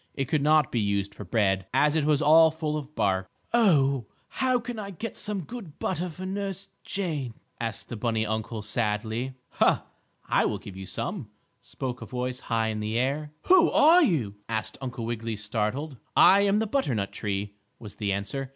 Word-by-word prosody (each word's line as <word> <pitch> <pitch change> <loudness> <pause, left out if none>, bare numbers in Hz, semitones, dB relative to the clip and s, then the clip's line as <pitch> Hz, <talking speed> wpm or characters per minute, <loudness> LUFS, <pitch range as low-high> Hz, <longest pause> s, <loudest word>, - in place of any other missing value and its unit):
It 135 - -1
could 150 +2 0
not 155 +1 +4
be 120 - 0
used 100 -1 0
for 105 - -8
bread, 95 -1 +1
as 150 +3 +4
it 155 -2 +2
was 150 -1 +3
all 160 +2 +7
full 155 -1 -3
of 150 0 -6
bark. 95 -1 0 0.2
"Oh, 140 - +3 0.2
how 255 -1 +1
can 235 -1 -6
I 200 -2 -5
get 205 +4 -6
some 205 -2 -2
good 195 -5 -9
butter 180 0 -2
for 180 +3 -8
Nurse 195 0 -4
Jane?" 150 - -3 0.2
asked 115 -2 -4
the - - -6
bunny 110 0 0
uncle 110 0 -3
sadly. 110 +3 -2 0.2
"Ha! - - +4 0.4
I - - +3
will - - 0
give 100 - -10
you 95 0 -8
some," 120 - -4 0.3
spoke 125 -2 -5
a - - -7
voice 125 0 -3
high 115 -2 0
in 110 -1 -3
the 110 +2 -2
air. 140 +4 -1
"Who 360 -2 +6
are 330 +5 +6
you?" 130 - +1
asked 110 -1 -2
Uncle 125 -3 -4
Wiggily, 115 -1 -3
startled. 110 +7 -3 0.2
"I 200 +1 +8
am 200 +1 +3
the 220 - +1
butternut 135 - -1
tree," 100 0 -3 0.2
was 105 -3 -10
the 105 -2 -1
answer. 115 +8 -3
130 Hz, 190 wpm, -27 LUFS, 110-165 Hz, 0.4 s, I